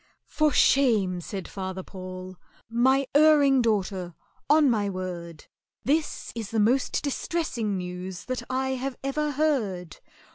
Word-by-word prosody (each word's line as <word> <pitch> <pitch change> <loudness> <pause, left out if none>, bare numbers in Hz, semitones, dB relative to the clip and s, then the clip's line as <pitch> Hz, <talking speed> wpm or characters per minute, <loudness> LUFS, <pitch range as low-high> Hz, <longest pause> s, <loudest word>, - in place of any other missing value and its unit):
"For 305 -1 +1
shame!" 215 -13 +3
said 190 +1 -6
FATHER 190 -1 -5
PAUL, 185 0 -8 0.4
"my 260 +4 +3
erring 290 -3 +6
daughter! 190 -6 -1 0.3
On 300 0 +6
my 210 -5 +1
word 175 -4 -6 0.4
This 300 +3 -1
is 225 -3 -5
the 225 - -1
most 245 +6 +2
distressing 270 - -2
news 180 0 -6
that 255 -1 -3
I 260 +1 0
have 265 0 -3
ever 300 +2 -1
heard. 225 - -1
225 Hz, 130 wpm, -26 LUFS, 185-275 Hz, 0.4 s, erring